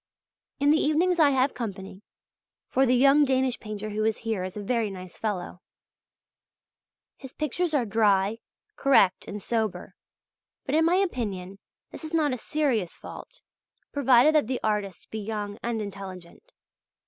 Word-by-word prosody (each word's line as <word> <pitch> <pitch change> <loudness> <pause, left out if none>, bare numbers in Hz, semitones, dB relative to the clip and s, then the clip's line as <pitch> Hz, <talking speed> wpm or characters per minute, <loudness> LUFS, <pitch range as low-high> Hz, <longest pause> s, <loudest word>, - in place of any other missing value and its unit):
In 285 +1 +4
the 315 - +4
evenings 340 +4 +2
I 300 -3 +6
have 265 0 +2
company; 195 -4 -6 0.7
for 265 0 +3
the 250 - +4
young 275 +3 +5
Danish 260 -2 +1
painter 215 0 -6
who 215 +1 -1
is 220 0 +1
here 220 -5 -1
is 185 +2 -6
a 205 - -5
very 230 0 0
nice 185 -2 -9
fellow. 190 -5 -4 1.6
His 265 -2 -11
pictures 315 +2 -1
are 255 -5 +2
dry, 210 -1 +2 0.4
correct, 200 -9 +3
and 210 - -5
sober; 220 -4 -2 0.7
but 270 - -3
in 320 +1 +4
my 340 +2 +3
opinion 205 - -2 0.3
this - - -9
is 315 +1 -4
not 300 -4 +2
a - - -2
serious 250 - -1
fault, - - -11 0.5
provided 270 +1 +5
that 300 -7 +3
the 255 0 -2
artist 205 -4 -2
be 220 - -4
young 210 0 -5
and 235 -1 -2
intelligent. 195 - -10
230 Hz, 155 wpm, -26 LUFS, 205-285 Hz, 1.6 s, I